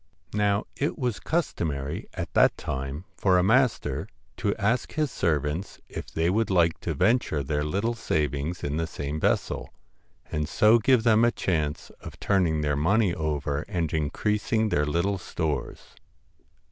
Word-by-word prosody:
Now 105 Hz, 0 st, +1 dB
it 145 Hz, -, -1 dB
was 125 Hz, -7 st, -1 dB
customary 75 Hz, -, -2 dB
at -, -, -5 dB
that -, -, +4 dB
time 70 Hz, +5 st, -4 dB
for 95 Hz, -2 st, +3 dB
a 90 Hz, -, +3 dB
master 125 Hz, +5 st, +2 dB, 0.3 s
to 100 Hz, -, 0 dB
ask 110 Hz, +4 st, 0 dB
his 155 Hz, -4 st, 0 dB
servants 75 Hz, +3 st, -1 dB
if -, -, -7 dB
they 80 Hz, +1 st, 0 dB
would 110 Hz, +5 st, +1 dB
like 85 Hz, -4 st, +3 dB
to -, -, -3 dB
venture 110 Hz, -, +2 dB
their 75 Hz, +2 st, -1 dB
little 100 Hz, +10 st, 0 dB
savings 75 Hz, -5 st, -2 dB
in 75 Hz, +1 st, -1 dB
the 80 Hz, 0 st, -1 dB
same 75 Hz, -1 st, -4 dB
vessel, -, -, 0 dB, 0.6 s
and 75 Hz, 0 st, -2 dB
so 110 Hz, +2 st, +5 dB
give 125 Hz, +1 st, +3 dB
them 115 Hz, -1 st, +5 dB
a 120 Hz, -, +6 dB
chance 75 Hz, -9 st, -2 dB
of -, -, -10 dB
turning 85 Hz, -6 st, +2 dB
their 75 Hz, -1 st, +1 dB
money 95 Hz, +6 st, +2 dB
over 75 Hz, -2 st, -2 dB
and 85 Hz, -5 st, -2 dB
increasing 105 Hz, -, 0 dB
their 75 Hz, -6 st, +1 dB
little 95 Hz, +6 st, 0 dB
stores. 80 Hz, -3 st, -4 dB
85 Hz, 155 wpm, -26 LUFS, 75-110 Hz, 0.6 s, a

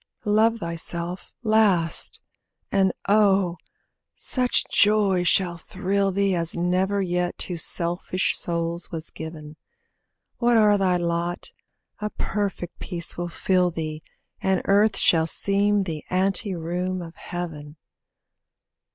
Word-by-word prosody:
Love 220 Hz, +2 st, +3 dB
thyself 170 Hz, -1 st, -4 dB
last, 210 Hz, -7 st, +2 dB, 0.5 s
and 190 Hz, -1 st, +3 dB, 0.2 s
oh! 195 Hz, -4 st, +3 dB, 0.6 s
such 250 Hz, -1 st, +2 dB
joy 205 Hz, -3 st, +3 dB
shall 175 Hz, -1 st, +1 dB
thrill 195 Hz, +4 st, -1 dB
thee 195 Hz, 0 st, +1 dB
As 170 Hz, -2 st, -2 dB
never 185 Hz, +3 st, +1 dB
yet 180 Hz, -1 st, -1 dB
to 180 Hz, -, -2 dB
selfish 175 Hz, +2 st, -1 dB
souls 170 Hz, 0 st, -2 dB
was 165 Hz, -1 st, -4 dB
given; 155 Hz, -1 st, -9 dB, 0.8 s
Whate'er 225 Hz, -4 st, +4 dB
thy 185 Hz, -2 st, +2 dB
lot, 170 Hz, 0 st, -2 dB, 0.5 s
a 210 Hz, -, -2 dB
perfect 200 Hz, -5 st, -3 dB
peace 170 Hz, -3 st, -5 dB
will 175 Hz, 0 st, -4 dB
fill 180 Hz, +1 st, +1 dB
thee, 155 Hz, -2 st, -5 dB, 0.4 s
And 190 Hz, -1 st, +1 dB
earth 205 Hz, +2 st, +3 dB
shall 160 Hz, -1 st, +3 dB
seem 200 Hz, +3 st, +2 dB
the 160 Hz, -5 st, -5 dB
ante 190 Hz, +1 st, +1 dB
room 180 Hz, +2 st, -3 dB
of 165 Hz, -1 st, -10 dB
Heaven. 155 Hz, -4 st, -6 dB
180 Hz, 115 wpm, -24 LUFS, 170-200 Hz, 0.8 s, Whate'er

